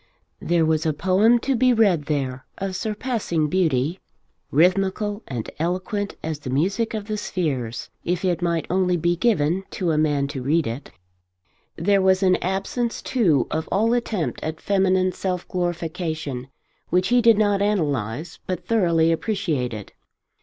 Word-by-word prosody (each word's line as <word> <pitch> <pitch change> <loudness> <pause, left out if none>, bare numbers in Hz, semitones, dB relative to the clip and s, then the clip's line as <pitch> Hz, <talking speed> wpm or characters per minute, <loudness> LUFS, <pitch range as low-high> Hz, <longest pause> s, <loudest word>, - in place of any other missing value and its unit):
There 170 -1 +2
was 155 -1 +1
a 155 - +1
poem 190 +9 +4
to 270 0 +2
be 250 +1 +4
read 195 -10 +3
there 130 -4 -2
of 195 -1 -3
surpassing 210 - -1
beauty, 160 -1 +1 0.5
rhythmical 195 +6 +2
and 120 -4 -4
eloquent 185 +5 -2
as 155 -2 -3
the 145 - -7
music 195 - 0
of 210 -2 -4
the 215 0 -3
spheres, 135 - -3 0.2
if 180 +1 -1
it 180 -1 0
might 170 -3 0
only 180 -1 +1
be 170 +1 +1
given 175 -3 +1
to 180 -5 0
a 155 - +1
man 145 -2 +1
to 135 - -5
read 150 +5 +1
it. 115 +5 -5 0.9
There 195 +3 +2
was 190 0 +3
an 185 -1 +4
absence, 195 +6 -2
too, 170 - +2
of 160 +1 -2
all 225 +4 +2
attempt 225 -8 -1
at 160 0 -4
feminine 185 -2 +2
self 180 0 -3
glorification 160 -6 -3 0.4
which 180 +3 +2
he 245 0 +4
did 230 -2 +6
not 205 -2 +2
analyse 155 - -1
but 180 -1 -3
thoroughly 170 -7 +3
appreciated. 155 - -2
180 Hz, 155 wpm, -23 LUFS, 155-200 Hz, 0.9 s, did